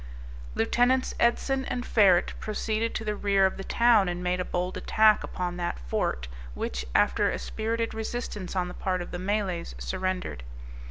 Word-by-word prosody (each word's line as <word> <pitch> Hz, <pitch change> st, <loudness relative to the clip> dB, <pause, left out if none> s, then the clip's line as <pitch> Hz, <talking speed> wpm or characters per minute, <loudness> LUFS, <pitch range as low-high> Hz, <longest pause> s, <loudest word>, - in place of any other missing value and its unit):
Lieutenants 245 Hz, -, +2 dB
Edson 265 Hz, +3 st, +2 dB
and 245 Hz, 0 st, -3 dB
Ferret 190 Hz, -5 st, +4 dB
proceeded 220 Hz, +1 st, -2 dB
to 220 Hz, -, -3 dB
the 210 Hz, 0 st, -1 dB
rear 200 Hz, -1 st, +3 dB
of 190 Hz, -, 0 dB
the 195 Hz, -, -5 dB
town, 230 Hz, -3 st, +4 dB
and 175 Hz, 0 st, -4 dB
made 180 Hz, 0 st, 0 dB
a -, -, 0 dB
bold 180 Hz, +1 st, -2 dB
attack 215 Hz, 0 st, +4 dB
upon 180 Hz, -1 st, -4 dB
that 175 Hz, -1 st, -2 dB
fort, -, -, -2 dB, 0.3 s
which, 60 Hz, +1 st, -3 dB
after -, -, +3 dB
a -, -, -2 dB
spirited 230 Hz, +1 st, -2 dB
resistance 220 Hz, -4 st, -4 dB
on 180 Hz, -1 st, 0 dB
the 180 Hz, -, -7 dB
part 185 Hz, -1 st, -2 dB
of -, -, -11 dB
the 175 Hz, -, -4 dB
Malays, 185 Hz, -, -2 dB
surrendered. 180 Hz, -, -3 dB
195 Hz, 170 wpm, -27 LUFS, 180-220 Hz, 0.3 s, Ferret